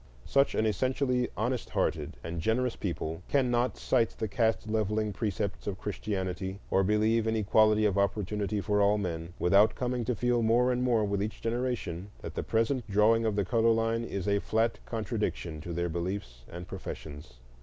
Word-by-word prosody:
Such 140 Hz, 0 st, +2 dB
an 110 Hz, -, +2 dB
essentially 125 Hz, +3 st, +1 dB
honest 120 Hz, +3 st, -1 dB
hearted -, -, -1 dB
and 85 Hz, 0 st, -4 dB
generous 120 Hz, +6 st, +1 dB
people 80 Hz, -3 st, -4 dB
cannot 125 Hz, -3 st, +1 dB
cite 115 Hz, -3 st, +2 dB
the 110 Hz, -, -2 dB
caste 110 Hz, 0 st, 0 dB
levelling 110 Hz, -1 st, 0 dB
precepts 100 Hz, 0 st, -3 dB
of 100 Hz, -2 st, -2 dB
Christianity, 95 Hz, -2 st, -3 dB
or 95 Hz, -, +4 dB
believe 110 Hz, +3 st, +2 dB
in 110 Hz, -, +1 dB
equality 110 Hz, 0 st, +4 dB
of 100 Hz, -1 st, +2 dB
opportunity 100 Hz, +1 st, -1 dB
for 105 Hz, +1 st, +1 dB
all 100 Hz, +1 st, +4 dB
men, 85 Hz, -3 st, -4 dB
without 100 Hz, +5 st, +4 dB
coming 125 Hz, -1 st, -1 dB
to 125 Hz, -, 0 dB
feel 120 Hz, +1 st, +1 dB
more 120 Hz, +3 st, +3 dB
and 125 Hz, 0 st, 0 dB
more 120 Hz, -4 st, +2 dB
with 100 Hz, -1 st, -1 dB
each 105 Hz, +1 st, -3 dB
generation 115 Hz, -6 st, -2 dB
that -, -, -6 dB
the -, -, -2 dB
present 115 Hz, +1 st, 0 dB
drawing 110 Hz, +3 st, +4 dB
of 105 Hz, -, 0 dB
the 100 Hz, -2 st, +1 dB
color 115 Hz, +2 st, +3 dB
line 115 Hz, 0 st, +1 dB
is 100 Hz, -4 st, -4 dB
a 100 Hz, 0 st, +3 dB
flat 115 Hz, +3 st, 0 dB
contradiction 105 Hz, -8 st, -3 dB
to 85 Hz, -, -6 dB
their 85 Hz, +1 st, -1 dB
beliefs 85 Hz, -8 st, -4 dB
and 85 Hz, +1 st, -7 dB
professions. 75 Hz, -6 st, -8 dB
105 Hz, 175 wpm, -29 LUFS, 95-115 Hz, -, or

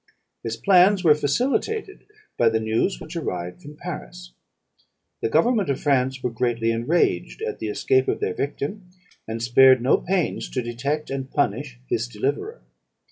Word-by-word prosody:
His 115 Hz, 0 st, -4 dB
plans 190 Hz, 0 st, +5 dB
were 155 Hz, -3 st, +7 dB
facilitated 260 Hz, -, -1 dB, 0.3 s
by 115 Hz, -, +4 dB
the 110 Hz, 0 st, 0 dB
news 110 Hz, -, 0 dB
which 160 Hz, +3 st, -9 dB
arrived 90 Hz, -, -4 dB
from 150 Hz, +1 st, -11 dB
Paris. -, -, -8 dB, 0.9 s
"The -, -, 0 dB
government 200 Hz, -, +2 dB
of 140 Hz, -, 0 dB
France 130 Hz, -2 st, +1 dB
were 125 Hz, -, -1 dB
greatly 115 Hz, -1 st, 0 dB
enraged 115 Hz, -, 0 dB
at -, -, -4 dB
the 110 Hz, -, -3 dB
escape 130 Hz, +5 st, +1 dB
of -, -, 0 dB
their 90 Hz, -, -1 dB
victim, 150 Hz, -, -4 dB, 0.4 s
and 115 Hz, +1 st, -4 dB
spared 130 Hz, +2 st, +6 dB
no 125 Hz, +3 st, +3 dB
pains 185 Hz, -3 st, -1 dB
to 125 Hz, -, -2 dB
detect 140 Hz, +6 st, -3 dB
and 135 Hz, -1 st, -4 dB
punish 135 Hz, -1 st, -1 dB
his 115 Hz, -2 st, -1 dB
deliverer. 140 Hz, -, -3 dB
130 Hz, 155 wpm, -23 LUFS, 115-160 Hz, 0.9 s, were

